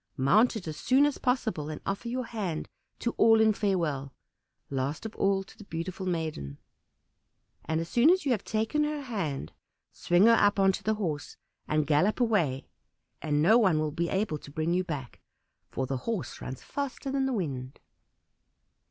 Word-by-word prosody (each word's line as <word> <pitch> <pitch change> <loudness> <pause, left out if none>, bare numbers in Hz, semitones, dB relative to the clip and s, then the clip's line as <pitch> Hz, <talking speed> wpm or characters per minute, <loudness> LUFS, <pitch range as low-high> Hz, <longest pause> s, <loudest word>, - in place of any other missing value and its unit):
Mount 210 - +4
it 195 -6 -6
as 155 -1 -5
soon 265 - +4
as 290 - -1
possible, 220 - -1
and 155 - -5
offer 200 +4 -3
your 250 +1 -2
hand 195 -9 -4 0.3
to 235 - -1
all 225 -1 +6
in 220 -1 +5
farewell; 165 -10 -1 0.6
last 140 +7 -2
of 220 - -5
all 195 0 +1
to - - -17
the - - -12
beautiful 185 +2 -5
maiden. 155 - -3 1.1
And 160 0 0
as 165 - -3
soon 240 - +4
as 370 -1 +3
you 275 - +2
have 215 -5 0
taken 220 +7 0
her 295 -1 -2
hand 170 - -4 0.4
swing 175 +3 +3
her 230 - +7
up 205 -2 +4
on 195 0 +5
to - - -5
the 220 0 0
horse, 160 -9 -4 0.3
and 155 -1 +1
gallop 155 - +2
away, 175 - +1 0.6
and 150 -1 +1
no 220 +8 +6
one 190 -8 +3
will 155 -1 0
be 170 +3 -1
able 190 -6 -1
to - - -12
bring 160 +3 -1
you 185 +1 +1
back, 145 -8 -6 0.5
for 130 - -2
the 135 0 -2
horse 180 - -4
runs 130 0 -7
faster 280 0 -4
than 270 -1 +1
the - - -1
wind." 135 - -4
185 Hz, 185 wpm, -29 LUFS, 150-225 Hz, 1.1 s, her